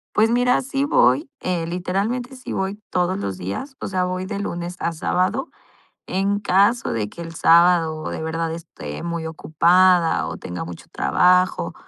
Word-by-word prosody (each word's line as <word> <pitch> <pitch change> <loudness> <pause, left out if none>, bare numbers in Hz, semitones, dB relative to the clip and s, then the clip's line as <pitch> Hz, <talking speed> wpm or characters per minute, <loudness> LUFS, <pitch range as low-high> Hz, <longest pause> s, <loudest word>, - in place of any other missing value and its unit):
Pues 220 +1 +4
mira, 245 +1 +3
sí 275 +1 -2
voy, 290 0 +3
eh, 175 -3 -2
literalmente 200 +9 -2
sí 255 - -8
voy 190 +1 -2
todos 180 +1 0
los 95 - -4
días. 100 - -6
O - - -4
sea, 185 -1 0
voy 185 0 -2
de 200 +1 -4
lunes 175 -3 -4
a 170 - -1
sábado. 185 - -1 0.6
En 195 +2 0
caso 205 +5 +2
de 105 -3 -2
que - - -11
el 165 -1 -7
sábado 165 -2 +4
de - - -5
verdad 165 +1 -2
esté 165 0 -8
muy 170 -1 -3
ocupada 170 +2 +3
o - - -6
tenga 90 -1 -6
mucho 85 0 -9
trabajo. 180 - +2
180 Hz, 165 wpm, -22 LUFS, 165-200 Hz, 0.6 s, Pues